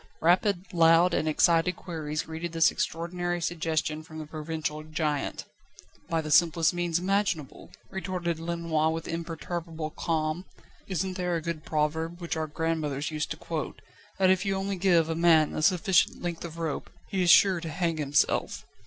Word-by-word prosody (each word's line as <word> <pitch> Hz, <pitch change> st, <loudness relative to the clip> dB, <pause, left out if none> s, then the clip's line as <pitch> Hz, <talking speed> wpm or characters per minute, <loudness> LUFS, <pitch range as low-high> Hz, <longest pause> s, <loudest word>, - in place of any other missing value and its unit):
rapid, 180 Hz, +2 st, +2 dB
loud 165 Hz, +1 st, +5 dB
and 155 Hz, -, 0 dB
excited 165 Hz, +3 st, +3 dB
queries 155 Hz, -4 st, -4 dB
greeted 160 Hz, +1 st, -6 dB
this 165 Hz, -1 st, +4 dB
extraordinary 175 Hz, +1 st, -2 dB
suggestion 160 Hz, -2 st, -1 dB
from 155 Hz, 0 st, -11 dB
the 155 Hz, -, -5 dB
provincial 155 Hz, 0 st, -4 dB
giant. 155 Hz, -2 st, -2 dB, 0.6 s
"By 165 Hz, -1 st, +1 dB
the 155 Hz, -1 st, -5 dB
simplest 165 Hz, 0 st, +4 dB
means 175 Hz, -1 st, 0 dB
imaginable," 185 Hz, -5 st, -1 dB, 0.2 s
retorted 180 Hz, -3 st, -3 dB
Lenoir 165 Hz, -2 st, 0 dB
with 165 Hz, 0 st, -4 dB
imperturbable 165 Hz, -1 st, -4 dB
calm. 160 Hz, +2 st, -2 dB, 0.4 s
"Isn't 190 Hz, 0 st, -2 dB
there 180 Hz, -1 st, -1 dB
a -, -, 0 dB
good 165 Hz, -2 st, -4 dB
proverb 160 Hz, +3 st, -1 dB
which 170 Hz, -1 st, -3 dB
our 160 Hz, -1 st, -2 dB
grandmothers 150 Hz, -2 st, -2 dB
used 155 Hz, 0 st, -2 dB
to -, -, -4 dB
quote, -, -, -5 dB, 0.4 s
that 185 Hz, -1 st, +4 dB
if 190 Hz, 0 st, +2 dB
you 195 Hz, -1 st, 0 dB
only 195 Hz, +1 st, -2 dB
give 175 Hz, -3 st, +3 dB
a 165 Hz, -, -1 dB
man 160 Hz, -2 st, +4 dB
a -, -, -2 dB
sufficient 180 Hz, +1 st, +3 dB
length 175 Hz, -2 st, -4 dB
of 165 Hz, -1 st, -7 dB
rope, 165 Hz, -3 st, -3 dB, 0.2 s
he 190 Hz, -, -1 dB
is 175 Hz, -, +2 dB
sure 185 Hz, -1 st, +6 dB
to 165 Hz, -, -5 dB
hang 165 Hz, 0 st, -1 dB
himself? 145 Hz, -1 st, +1 dB
165 Hz, 165 wpm, -28 LUFS, 155-175 Hz, 0.6 s, sure